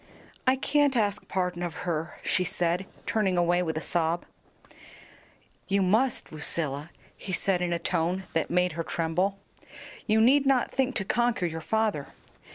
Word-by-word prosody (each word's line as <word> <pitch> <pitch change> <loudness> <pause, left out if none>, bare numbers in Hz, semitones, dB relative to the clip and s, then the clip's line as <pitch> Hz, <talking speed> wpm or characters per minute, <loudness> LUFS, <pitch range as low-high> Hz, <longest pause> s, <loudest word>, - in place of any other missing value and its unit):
"I 255 - +6
can't 285 0 +2
ask 210 -2 0
pardon 180 -2 -1
of 175 -2 -3
her," 165 -1 -2
she 185 - +1
said, 175 +1 -1 0.2
turning 195 -5 +1
away 175 +1 +3
with 160 -3 -2
a - - -2
sob. 170 0 0 1.4
"You 195 0 +2
must, 225 +7 +1
Lucilla," 150 -1 -2 0.3
he 195 - -7
said 185 0 +1
in 175 -1 0
a 170 - +1
tone 175 +3 -1
that 165 - 0
made 180 +1 +2
her 165 +1 -3
tremble. 175 +5 0 0.7
"You 215 +1 +4
need 270 +5 +5
not 265 -3 +3
think 265 0 0
to 195 - -1
conquer 240 -3 +1
your 160 -1 -3
father. 215 -6 0
180 Hz, 160 wpm, -28 LUFS, 170-220 Hz, 1.4 s, I